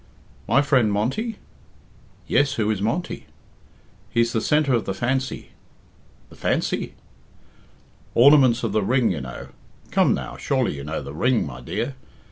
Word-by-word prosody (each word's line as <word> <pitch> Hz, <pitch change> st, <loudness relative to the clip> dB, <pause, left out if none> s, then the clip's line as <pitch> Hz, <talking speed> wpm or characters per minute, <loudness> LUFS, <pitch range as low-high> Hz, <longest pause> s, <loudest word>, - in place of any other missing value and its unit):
"My 140 Hz, -, +4 dB
friend 130 Hz, -7 st, +3 dB
Monty?" 130 Hz, -, -1 dB, 0.9 s
"Yes; 145 Hz, -1 st, +2 dB
who 110 Hz, -4 st, 0 dB
is 100 Hz, -3 st, -2 dB
Monty?" 145 Hz, -, -2 dB, 0.8 s
"He's 115 Hz, 0 st, +1 dB
the 110 Hz, -, +1 dB
centre 150 Hz, -3 st, +2 dB
of 115 Hz, -3 st, +1 dB
the 95 Hz, -, -3 dB
Fancy." 130 Hz, +5 st, -2 dB, 0.8 s
"The -, -, -13 dB
Fancy!" -, -, -1 dB, 1.2 s
"Ornaments 130 Hz, -2 st, +6 dB
of 115 Hz, -, 0 dB
the 110 Hz, +1 st, +1 dB
Ring, 120 Hz, +1 st, +2 dB
you 75 Hz, -6 st, -3 dB
know. 65 Hz, 0 st, -8 dB, 0.4 s
Come -, -, +3 dB
now, -, -, -6 dB
surely -, -, 0 dB
you 70 Hz, -, -7 dB
know 75 Hz, 0 st, -4 dB
the 70 Hz, +1 st, -8 dB
Ring, 120 Hz, -, +1 dB
my 65 Hz, -4 st, -8 dB
dear. 120 Hz, -, -3 dB
115 Hz, 145 wpm, -23 LUFS, 100-135 Hz, 1.2 s, Ornaments